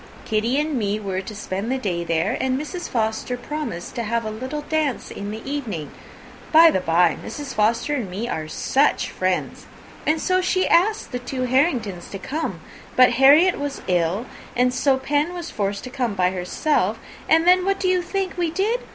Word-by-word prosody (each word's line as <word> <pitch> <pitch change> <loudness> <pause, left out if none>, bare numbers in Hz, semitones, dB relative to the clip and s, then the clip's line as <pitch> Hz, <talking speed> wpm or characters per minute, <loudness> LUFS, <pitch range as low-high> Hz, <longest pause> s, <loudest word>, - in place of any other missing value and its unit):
Kitty 230 +5 +1
and 305 +1 -1
me 205 0 -1
were 190 -2 -3
to 210 +2 -8
spend 200 +2 -4
the 265 - +1
day 180 -8 -2
there, 165 -1 0
and 260 0 0
Mrs. 345 +4 -5
Forster 220 +1 -1
promised 265 - -5
to 240 - -3
have 230 0 -1
a 215 - -3
little 260 +7 -5
dance 305 -4 -1
in 200 - -6
the 220 +4 -7
evening; 225 - -4 0.6
(by 325 +1 +8
the - - +1
bye, 170 -1 +3
Mrs. 290 -2 -6
Forster 230 +7 +1
and 245 -9 -2
me 205 +6 -4
are 160 -9 -3
such 275 - +1
friends!) 185 0 -2 0.4
and 315 +1 +2
so 370 +2 +1
she 370 0 +1
asked 415 +6 +2
the 250 - -3
two 255 +1 -4
Harringtons 250 - 0
to 195 - -6
come: 300 +11 -4 0.3
but 255 -1 +7
Harriet 285 +9 +6
was 285 -1 -4
ill, 180 +5 +1 0.3
and 250 +1 +2
so 265 +1 +2
Pen 295 +6 0
was 345 -2 -6
forced 200 -1 -2
to 255 - -7
come 245 -6 -2
by 180 -1 +2
herself; 190 - 0 0.3
and 325 +1 +5
then, 365 0 +6
what 390 +1 0
do 375 - 0
you 365 -1 +3
think 380 +1 -3
we 345 -2 +1
did? 405 +9 0
255 Hz, 195 wpm, -22 LUFS, 205-310 Hz, 0.6 s, by